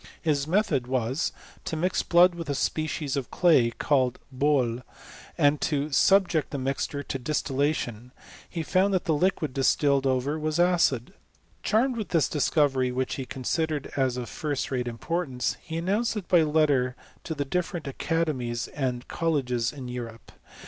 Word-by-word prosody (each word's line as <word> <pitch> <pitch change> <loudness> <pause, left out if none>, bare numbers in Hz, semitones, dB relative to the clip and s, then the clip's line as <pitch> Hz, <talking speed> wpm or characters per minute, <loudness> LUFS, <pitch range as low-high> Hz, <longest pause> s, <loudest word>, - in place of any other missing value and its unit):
His 150 -3 0
method 160 - +1
was, 130 +3 0 0.3
to - - -3
mix 180 +4 0
blood 175 +1 +5
with 165 -3 -7
a 140 - 0
species 155 -1 -1
of 135 -3 -3
clay, 155 -10 +4
called 130 +1 +1 0.2
boUy 130 -4 +1 0.6
and 145 0 +3
to 150 0 -1
subject 180 0 +3
the 140 - -4
mixture 140 +2 -2
to 135 - -4
distillation, 130 -3 -1 0.4
He 165 -2 -3
found 190 +4 +2
that 185 - -1
the 165 - +2
liquid 155 -3 0
distilled 135 0 +2
ove? 130 -1 +1
was 155 +2 -1
acid. 175 -9 +2 0.5
Charmed 240 +3 +1
with 215 - -4
this 165 -5 +2
discovery, 140 -3 +2
whrch 130 +1 -2
he 130 -2 -5
con 130 - -7
sidered 155 +1 -1
as 130 -2 +1
of 125 -1 -4
first 145 -3 -3
rate 125 -2 -1
importance, 130 +1 -2
he 160 0 -5
announced 205 +7 0
it 190 -5 -5
by 175 -2 +5
letter 150 -5 +2 0.3
to 160 - -4
the 145 - -2
different 175 +2 -2
academies 135 -5 -2
and 125 -4 -3
colleges 130 -8 0
in 135 -4 -8
Eu 125 0 -4
rope. 115 -1 -10
145 Hz, 165 wpm, -26 LUFS, 130-165 Hz, 0.6 s, blood